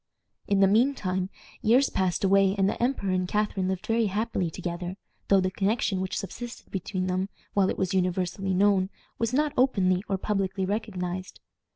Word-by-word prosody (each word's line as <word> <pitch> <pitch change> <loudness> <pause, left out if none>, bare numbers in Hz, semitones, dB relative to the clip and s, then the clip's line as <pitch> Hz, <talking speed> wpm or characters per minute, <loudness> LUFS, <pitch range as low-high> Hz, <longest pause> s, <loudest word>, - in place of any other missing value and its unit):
In 200 -1 +2
the 195 - +7
mean 240 +8 +3
time, 185 -3 -2 0.3
years 245 +4 +4
passed 185 -1 0
away, 195 0 +4
and 195 -1 +3
the - - -2
emperor 240 -6 0
and 185 -1 0
Catharine 205 -2 0
lived 190 -1 -2
very 225 -1 +2
happily 205 -3 -1
together, 175 +2 -5 0.3
though 195 - +5
the 185 0 0
connection 195 -1 0
which 190 - -3
subsisted 235 +5 -7
between 185 0 -2
them, 185 +1 -1 0.2
while 195 -2 +3
it - - -2
was 190 -1 -1
universally 185 +1 0
known, 195 -1 +3 0.3
was 230 0 0
not 295 +3 +1
openly 190 -8 +2
or 195 - +1
publicly 195 -1 -1
recognized. 185 -3 -3
195 Hz, 175 wpm, -27 LUFS, 185-210 Hz, 0.3 s, the